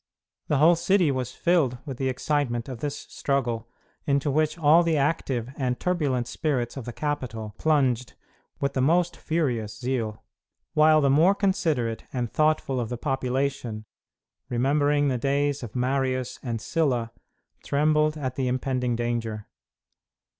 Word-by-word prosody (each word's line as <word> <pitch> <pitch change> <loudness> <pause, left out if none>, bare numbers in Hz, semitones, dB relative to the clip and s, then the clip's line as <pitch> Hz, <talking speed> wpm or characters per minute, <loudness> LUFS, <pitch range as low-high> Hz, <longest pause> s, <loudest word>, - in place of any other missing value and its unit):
The 150 - +2
whole 160 +5 +6
city 175 -1 +2
was 130 -2 -2
filled 160 -8 +1
with 135 -5 -6
the 130 0 0
excitement 130 -3 -1
of 130 -4 -6
this 145 +2 -3
struggle, 120 -7 -2 0.4
into 140 0 +1
which 155 +2 +1
all 160 +1 +6
the 165 -2 +1
active 135 -5 -1
and 125 -2 -1
turbulent 145 -9 0
spirits 125 -2 -2
of 135 -4 -6
the 120 - -5
capital 115 -7 -4
plunged 130 -6 +1 0.4
with 140 -1 -1
the 130 - 0
most 170 +5 +2
furious 120 -10 -2
zeal, 120 -4 -2 0.5
while 155 0 +5
the 140 -1 +3
more 165 +8 +5
considerate 155 - 0
and 120 -3 -3
thoughtful 155 -4 +1
of 115 -2 -3
the 120 - -3
population, 130 -4 -2 0.6
remembering 145 +4 +2
the 130 -3 0
days 140 +2 0
of 120 -2 -8
Marius 130 0 -1
and 115 -3 -3
Sylla, 125 -3 0 0.5
trembled 150 +1 +2
at 130 -4 -3
the 130 0 -1
impending 125 -1 -1
danger. 115 -2 -2
135 Hz, 145 wpm, -26 LUFS, 120-150 Hz, 0.6 s, whole